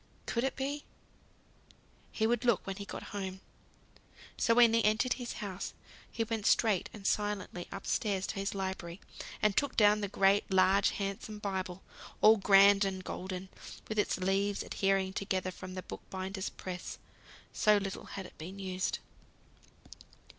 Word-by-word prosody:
Could 235 - -1
it 265 - 0
be? 280 +2 -3 1.3
He 220 - 0
would 240 +1 +1
look 235 -6 +2
when 195 -1 -4
he 200 - -6
got - - -7
home. 190 -2 -4 1.0
So 230 - +3
when 235 -2 +7
he 230 -1 +3
entered 215 +4 +3
his 245 -1 -5
house 195 -3 -5 0.4
he 230 - -1
went 225 -2 -2
straight 215 -6 +3
and 205 -3 -11
silently 205 -4 -1
up 195 - -7
stairs 195 -3 0
to - - -4
his 195 +1 -2
library, 190 -2 -4 0.4
and 210 -2 +4
took 285 - 0
down 210 -1 +5
the 205 - -1
great 195 +1 +3
large 190 +1 +4
handsome 200 +2 -4
Bible, 190 -3 -4 0.4
all 220 +1 +7
grand 200 0 +6
and 190 -1 -2
golden, 185 +1 -5 0.4
with 215 -1 -2
its - - +1
leaves 195 +2 0
adhering 195 -1 0
together 190 -2 -1
from 185 +1 -9
the 185 - -5
bookbinder's 190 0 -5
press, 180 -1 -7 0.6
so 210 0 +4
little 195 -1 -4
had 195 - -7
it - - -13
been 180 +5 -7
used. 190 -1 -2
195 Hz, 155 wpm, -32 LUFS, 190-210 Hz, 1.3 s, when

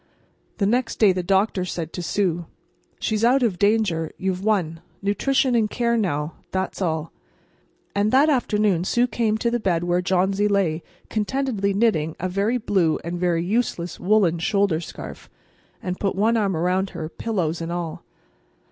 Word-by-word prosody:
The 200 - +1
next 240 +4 0
day 210 -3 +6
the 180 - -1
doctor 190 +1 +1
said 170 -3 -4
to 180 - -4
Sue: 175 -1 -1 0.5
"She's 215 0 -1
out 255 +3 +4
of 205 -7 0
danger. 200 -6 +2
You've 190 0 -2
won. 175 -7 0 0.2
Nutrition 260 +6 +1
and 220 -3 +2
care 235 +1 0
now—that's 185 0 -2
all." 160 -3 -1 0.8
And 205 +1 +1
that 275 +4 +5
afternoon 210 - +2
Sue 240 +6 +2
came 220 -2 0
to 235 +1 0
the 240 - 0
bed 175 -6 0
where 175 0 +1
Johnsy 190 +3 +1
lay, 190 -6 +1 0.3
contentedly 215 -3 -1
knitting 165 -8 +1
a 185 - -1
very 200 +6 0
blue 185 -8 +1
and 175 +1 -4
very 170 -1 +1
useless 185 -5 -1
woolen 185 -4 +3
shoulder 195 -1 +1
scarf, - - -9 0.5
and 180 -1 -3
put 195 -2 0
one 220 +4 +2
arm 200 -6 +1
around 185 +3 +1
her, 160 -2 -3
pillows 170 -3 -2
and 165 +1 -4
all. 170 -2 -4
195 Hz, 160 wpm, -23 LUFS, 175-215 Hz, 0.8 s, day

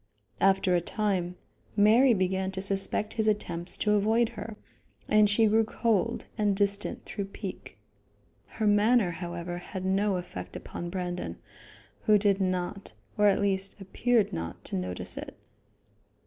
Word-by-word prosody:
After 195 -1 +3
a 175 - +2
time, 185 -2 -1 0.4
Mary 230 +5 +6
began 190 0 0
to 190 - -2
suspect 195 +2 -1
his 220 -1 0
attempts 180 -5 0
to 210 - +1
avoid 220 +3 +3
her, 225 -2 -8 0.5
and 215 -1 +5
she 220 +2 +4
grew 220 +1 +4
cold 230 0 0
and 205 -2 +2
distant 200 0 -1
through 200 - -4
pique. 195 - -8 0.8
Her 220 - 0
manner, 210 -1 +4
however, 175 0 -5
had 185 +1 -6
no 195 +1 +1
effect 180 0 -7
upon 175 - -6
Brandon, 175 - -4 0.7
who 215 - +6
did 200 -1 +2
not, 185 - -2 0.2
or 210 - +4
at 200 - +3
least 195 0 0
appeared 225 +3 +1
not 85 0 -5
to - - -2
notice 90 -1 -4
it. - - -9
195 Hz, 145 wpm, -28 LUFS, 180-210 Hz, 0.8 s, Mary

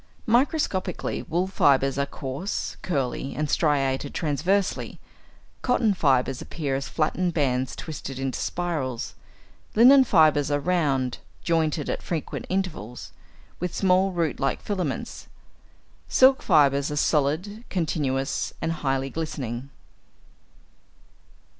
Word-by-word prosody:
= - - -32
Microscopically, 235 - 0
wool 175 +3 -1
fibres 140 -7 +2
are 140 - 0
coarse, 140 +9 -4
curly, 135 -4 -2
and 150 0 -1
striated 140 -3 0
transversely; 180 +6 0 0.6
cotton 240 -4 +2
fibres 135 -7 +1
appear 145 -5 -3
as 135 0 -3
flattened 170 +2 0
bands 130 -4 0
twisted 140 -4 -6
into 135 -1 -3
spirals; 150 -9 -3 0.6
linen 260 +5 +8
fibres 155 - +4
are 145 0 +1
round, 145 -7 0 0.2
jointed 160 -3 0
at - - -2
frequent 165 -4 -4
intervals, 170 - -3 0.5
with 180 0 -3
small 190 0 +3
root 170 -4 -1
like 135 -1 0
filaments; 180 -9 -3 0.8
silk 260 +1 +5
fibres 140 -4 +3
are 150 - -3
solid, 160 +9 0
continuous, 145 -6 -1
and 165 - -1
highly 135 0 -1
glistening. 135 -5 -4
155 Hz, 110 wpm, -25 LUFS, 135-180 Hz, 0.8 s, linen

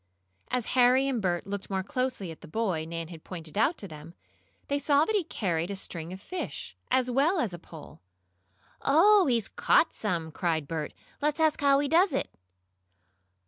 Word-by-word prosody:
As 250 -3 -1
Harry 255 +2 +5
and 255 -5 -1
Bert 175 -3 -1
looked 200 0 -5
more 190 -1 -1
closely 255 - -2
at 160 - -12
the - - -11
boy 180 -3 -1
Nan 165 -1 -5
had 165 -3 -11
pointed 165 -4 -7
out 250 +11 +2
to 200 - -5
them, 155 +1 -11 0.5
they 285 0 0
saw 290 +1 +3
that 440 - 0
he 400 - +2
carried 175 - -2
a 200 - -3
string 170 -3 -6
of 190 - -7
fish, 365 - -6
as 255 -1 +2
well 290 +9 +3
as 240 - 0
the 175 - -7
pole. 160 -2 -13 0.8
"Oh, 375 +6 +5
he's 235 -5 +1
caught 325 - +3
some!" 170 -6 -2
cried 160 -3 -1
Bert. 155 -1 -4 0.3
"Let's 300 +2 +1
ask 315 -2 +2
how 280 -1 +5
he 285 +1 +1
does 335 0 +4
it." - - -2
220 Hz, 185 wpm, -28 LUFS, 170-280 Hz, 0.8 s, Harry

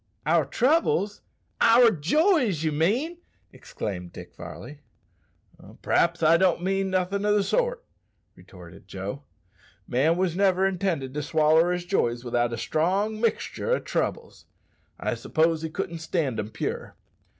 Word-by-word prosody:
"Our 160 0 +3
troubles? 230 - +1 0.4
our 230 0 +6
joys, 225 - +2
you 155 - +1
mean!" 235 - 0 0.3
exclaimed 90 -4 -6
Dick - - -11
Varley. 145 0 -10 1.0
"P'r'aps 170 0 +1
I 165 +2 +6
don't 180 -1 +2
mean 195 +1 0
nothin' 190 +2 -1
o' 210 0 +2
the 205 - +2
sort," - - -1 0.5
retorted 90 -1 -15
Joe. 100 +8 -6 0.7
"Man 150 +7 +2
wos 185 -2 0
never 190 -1 +2
intended 175 -8 -1
to 150 - -3
swaller 160 +3 +3
his 180 0 -3
joys 120 -10 0
without 120 -1 0
a 115 - -4
strong 190 - -1
mixtur' 240 - -1
o' - - -2
troubles. 470 - -4 0.5
I - - -1
s'pose 160 0 0
he 160 - -4
couldn't 170 0 -4
stand 160 -7 -2
'em 105 0 -4
pure. 110 - -5
170 Hz, 140 wpm, -25 LUFS, 150-200 Hz, 1.0 s, our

